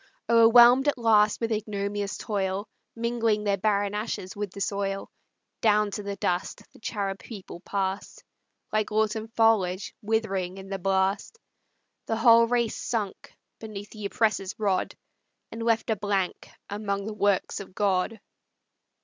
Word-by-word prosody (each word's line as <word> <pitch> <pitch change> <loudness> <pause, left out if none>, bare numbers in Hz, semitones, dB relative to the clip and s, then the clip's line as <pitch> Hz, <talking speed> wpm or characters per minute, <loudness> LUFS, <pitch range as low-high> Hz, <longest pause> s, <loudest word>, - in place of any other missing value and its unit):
O'erwhelm'd 235 +3 +7
at 290 - +2
length 215 -3 +4
with 230 -1 -2
ignominious 205 -1 -2
toil, 195 -1 -2 0.3
Mingling 230 -2 0
their 200 -2 0
barren 205 0 +1
ashes 210 -3 -4
with 205 0 -3
the 200 - -10
soil, 195 0 -2 0.5
Down 210 -1 +3
to 210 - -4
the 200 0 -4
dust 180 -2 -2
the - - -17
Charib 200 -3 -3
people 195 -6 -9
pass'd, 195 - -3 0.5
Like 215 0 0
autumn 215 +1 0
foliage 215 -5 +2
withering 195 -4 -1
in 195 0 -10
the 195 -1 -3
blast: 195 - 0 0.7
The 225 - 0
whole 230 0 +6
race 235 -2 +1
sunk 215 -5 -4 0.2
beneath 210 -2 -8
the 215 -2 -8
oppressor's 215 -3 0
rod, 200 -4 0 0.6
And 225 - -6
left 230 -1 +1
a - - +2
blank 195 -2 -2 0.2
among 200 -1 -3
the 215 - -4
works 205 -2 +1
of 190 -2 -10
God. 205 +2 0
210 Hz, 140 wpm, -27 LUFS, 195-225 Hz, 0.7 s, O'erwhelm'd